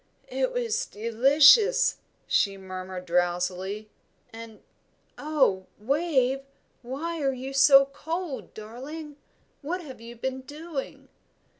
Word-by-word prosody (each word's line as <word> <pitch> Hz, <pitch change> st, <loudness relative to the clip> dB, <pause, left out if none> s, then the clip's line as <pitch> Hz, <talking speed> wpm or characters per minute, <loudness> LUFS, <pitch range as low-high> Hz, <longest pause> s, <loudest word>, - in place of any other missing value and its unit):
"It -, -, 0 dB
was 475 Hz, -2 st, -1 dB
delicious," 285 Hz, -, +5 dB, 0.3 s
she 195 Hz, -1 st, +1 dB
murmured, 185 Hz, -1 st, -7 dB
drowsily; 180 Hz, +4 st, -1 dB, 0.5 s
"and 225 Hz, -1 st, -11 dB, 0.5 s
oh, 270 Hz, -12 st, +1 dB
Wave, 270 Hz, +2 st, +1 dB, 0.4 s
why 305 Hz, +7 st, -4 dB
are 270 Hz, -1 st, +1 dB
you 260 Hz, +1 st, -6 dB
so 275 Hz, 0 st, +7 dB
cold, 315 Hz, +2 st, -6 dB
darling? 280 Hz, +8 st, -9 dB, 0.4 s
What 345 Hz, +5 st, -3 dB
have 265 Hz, -6 st, -11 dB
you 235 Hz, +1 st, -10 dB
been 260 Hz, +2 st, -4 dB
doing?" 295 Hz, +1 st, -7 dB
265 Hz, 105 wpm, -26 LUFS, 215-310 Hz, 0.5 s, so